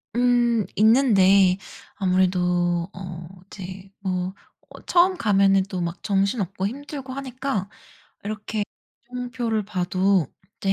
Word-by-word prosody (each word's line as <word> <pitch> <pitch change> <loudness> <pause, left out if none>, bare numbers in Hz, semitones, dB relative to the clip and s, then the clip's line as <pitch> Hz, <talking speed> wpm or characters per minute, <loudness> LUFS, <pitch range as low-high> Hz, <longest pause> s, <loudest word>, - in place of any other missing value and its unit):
음. 240 -3 +3
있는데 200 -5 +5 0.4
아무래도 180 -2 +1
어 175 -3 -8 0.2
이제 190 0 -9
뭐 185 -1 -2 0.4
어 - - -13
처음 365 +1 +4
가면은 195 - +3
또 185 - -3
막 170 0 -4
정신없고 195 -1 0
힘들고 275 +2 -7
하니까 260 -6 -3 0.5
이렇게 210 +1 -3 0.5
이정표를 245 -3 -2
봐도 185 -3 +1 0.3
이제 195 - +2
195 Hz, 230 characters per minute, -24 LUFS, 185-240 Hz, 0.5 s, 있는데